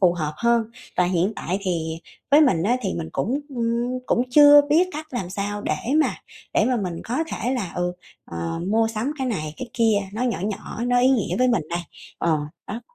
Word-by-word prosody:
phù 180 Hz, -3 st, +5 dB
hợp 155 Hz, -3 st, -2 dB
hơn. 235 Hz, -1 st, +2 dB, 0.3 s
Và 180 Hz, -, +4 dB
hiện 180 Hz, +3 st, +1 dB
tại 185 Hz, +3 st, -2 dB
thì 165 Hz, -3 st, -2 dB, 0.3 s
với 295 Hz, +2 st, +7 dB
mình 190 Hz, -, +4 dB
á 240 Hz, +6 st, +2 dB
thì 190 Hz, -, -2 dB
mình 160 Hz, -1 st, -4 dB
cũng, 270 Hz, +6 st, -1 dB
ừm, 240 Hz, 0 st, -1 dB
cũng 240 Hz, -, +2 dB
chưa 290 Hz, +1 st, +9 dB
biết 350 Hz, +4 st, +4 dB
cách 310 Hz, +1 st, -6 dB
làm 195 Hz, -8 st, -4 dB
sao 205 Hz, +2 st, -3 dB
để 155 Hz, -, 0 dB, 0.3 s
mà -, -, +1 dB, 0.4 s
để -, -, +4 dB
mà 255 Hz, -1 st, +1 dB
mình 180 Hz, -5 st, -3 dB
có 240 Hz, -, -3 dB
thể 250 Hz, -4 st, -2 dB
là, 195 Hz, -9 st, -3 dB
ừ, 180 Hz, 0 st, 0 dB, 0.3 s
ờ, 85 Hz, -, -4 dB
mua 225 Hz, +1 st, +2 dB
sắm 225 Hz, +6 st, -2 dB
cái 265 Hz, -, -1 dB
này 155 Hz, -10 st, -3 dB
cái 255 Hz, -, -6 dB
kia, 225 Hz, -4 st, +3 dB
nó 220 Hz, -, -3 dB
nhỏ 240 Hz, -9 st, 0 dB
nhỏ, 215 Hz, +3 st, -4 dB
nó 245 Hz, 0 st, +3 dB
ý 255 Hz, -, +5 dB
nghĩa 245 Hz, -6 st, +1 dB
với 255 Hz, 0 st, +4 dB
mình 235 Hz, -9 st, +2 dB
đây. 170 Hz, +1 st, -1 dB, 0.4 s
Ờ, 165 Hz, -2 st, +2 dB, 0.3 s
đó. 220 Hz, +4 st, -5 dB
225 Hz, 220 wpm, -23 LUFS, 180-250 Hz, 0.4 s, chưa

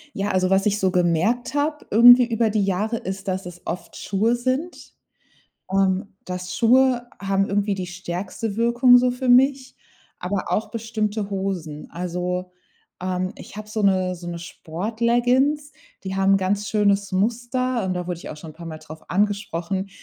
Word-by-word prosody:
Ja, 200 Hz, +1 st, -1 dB
also 185 Hz, 0 st, +1 dB
was 195 Hz, +1 st, +3 dB
ich 205 Hz, 0 st, +2 dB
so 190 Hz, -2 st, +2 dB
gemerkt 180 Hz, +8 st, +1 dB
habe 300 Hz, +1 st, -1 dB
irgendwie 245 Hz, +3 st, +8 dB
über 230 Hz, -1 st, +1 dB
die 210 Hz, -1 st, +1 dB
Jahre 210 Hz, +5 st, -1 dB
ist, 195 Hz, 0 st, -6 dB
dass 190 Hz, 0 st, -2 dB
es 175 Hz, -1 st, -10 dB
oft 170 Hz, -1 st, -6 dB
Schuhe 215 Hz, +4 st, 0 dB
sind, 260 Hz, +8 st, -3 dB, 0.8 s
ähm, 190 Hz, 0 st, +1 dB
dass 180 Hz, 0 st, -5 dB
Schuhe 245 Hz, +1 st, +4 dB
haben 195 Hz, 0 st, +1 dB
irgendwie 205 Hz, 0 st, 0 dB
die 185 Hz, -2 st, -4 dB
stärkste 185 Hz, +4 st, -5 dB
Wirkung 240 Hz, +2 st, +5 dB
so 250 Hz, 0 st, +3 dB
für 250 Hz, +1 st, -3 dB
mich, 260 Hz, +1 st, +4 dB, 0.4 s
aber 185 Hz, +2 st, -3 dB
auch 215 Hz, -, 0 dB
bestimmte 215 Hz, -2 st, -3 dB
Hosen. 190 Hz, -6 st, -4 dB
Also, 180 Hz, +1 st, -3 dB, 0.5 s
ähm, 185 Hz, 0 st, -2 dB
ich -, -, -11 dB
habe 215 Hz, 0 st, -8 dB
so 215 Hz, 0 st, -2 dB
'ne 185 Hz, -2 st, +2 dB
so 175 Hz, 0 st, -9 dB
'ne 170 Hz, 0 st, -4 dB
Sportleggings, 235 Hz, -, 0 dB, 0.3 s
die 190 Hz, 0 st, -4 dB
haben 195 Hz, 0 st, +4 dB
'n -, -, +5 dB
ganz 195 Hz, +2 st, -1 dB
schönes 200 Hz, -2 st, +1 dB
Muster, 240 Hz, +3 st, 0 dB
und 185 Hz, -, -1 dB
da 180 Hz, -1 st, -3 dB
wurde 180 Hz, -1 st, -3 dB
ich -, -, -9 dB
auch -, -, -6 dB
schon 155 Hz, +1 st, -10 dB
'n -, -, -21 dB
paarmal 160 Hz, -1 st, -8 dB
drauf 155 Hz, +1 st, -13 dB
angesprochen. 195 Hz, -1 st, -1 dB
200 Hz, 170 wpm, -23 LUFS, 180-235 Hz, 0.8 s, irgendwie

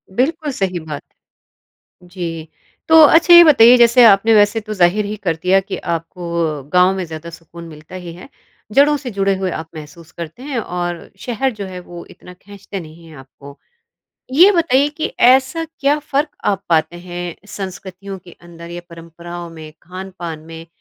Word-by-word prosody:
बिल्कुल 300 Hz, -, -1 dB
सही 190 Hz, -7 st, -2 dB
बात। 155 Hz, -2 st, -7 dB, 1.0 s
जी। 170 Hz, -3 st, -7 dB, 0.4 s
तो 320 Hz, 0 st, +7 dB
अच्छा, 340 Hz, +3 st, +5 dB
ये 345 Hz, 0 st, +11 dB
बताइए 250 Hz, -6 st, +7 dB
जैसे 240 Hz, +1 st, +5 dB
आपने 220 Hz, +2 st, +5 dB
वैसे 210 Hz, +2 st, +3 dB
तो 215 Hz, 0 st, -7 dB
ज़ाहिर 195 Hz, +2 st, +2 dB
ही 210 Hz, -, -4 dB
कर 165 Hz, -4 st, 0 dB
दिया 190 Hz, +2 st, +3 dB
कि 190 Hz, -, -6 dB, 0.2 s
आपको 170 Hz, +1 st, -6 dB, 0.4 s
गाँव 180 Hz, +1 st, +4 dB
में 190 Hz, -, -3 dB
ज़्यादा 160 Hz, +1 st, -9 dB
सुकून 170 Hz, 0 st, -13 dB
मिलता 155 Hz, +3 st, -13 dB
ही 170 Hz, -, -8 dB
है। 175 Hz, -, -13 dB, 0.4 s
जड़ों 290 Hz, +2 st, +4 dB
से 265 Hz, -3 st, -7 dB
जुड़े 195 Hz, -1 st, 0 dB
हुए 190 Hz, -1 st, -2 dB
आप 160 Hz, 0 st, -9 dB
महसूस 155 Hz, +2 st, -12 dB
करते 170 Hz, +9 st, -9 dB
हैं 275 Hz, -5 st, -3 dB
और 175 Hz, -4 st, -5 dB
शहर 255 Hz, +2 st, -2 dB
जो 200 Hz, -, -4 dB
है 185 Hz, -1 st, -8 dB
वो 175 Hz, -1 st, -11 dB
इतना 180 Hz, -, -14 dB
खींचते 200 Hz, +1 st, -10 dB
नहीं 165 Hz, 0 st, -13 dB
हैं 155 Hz, -, -14 dB
आपको। 140 Hz, +1 st, -14 dB, 0.8 s
ये 355 Hz, +8 st, +7 dB
बताइए 295 Hz, -6 st, +2 dB
कि 310 Hz, +2 st, -4 dB, 0.2 s
ऐसा 265 Hz, +6 st, +3 dB
क्या 300 Hz, -2 st, -1 dB
फ़र्क 290 Hz, +1 st, -2 dB, 0.2 s
आप 200 Hz, -, -1 dB
पाते 165 Hz, +1 st, +1 dB
हैं 175 Hz, -1 st, -7 dB
संस्कृतियों 190 Hz, 0 st, -8 dB
के 175 Hz, -, -14 dB
अंदर 170 Hz, 0 st, -12 dB
या 175 Hz, 0 st, -7 dB
परंपराओं 170 Hz, +1 st, -10 dB
में 155 Hz, -2 st, -11 dB
खानपान 180 Hz, -2 st, -8 dB
में, 165 Hz, +1 st, -12 dB
185 Hz, 175 wpm, -17 LUFS, 170-240 Hz, 1.0 s, ये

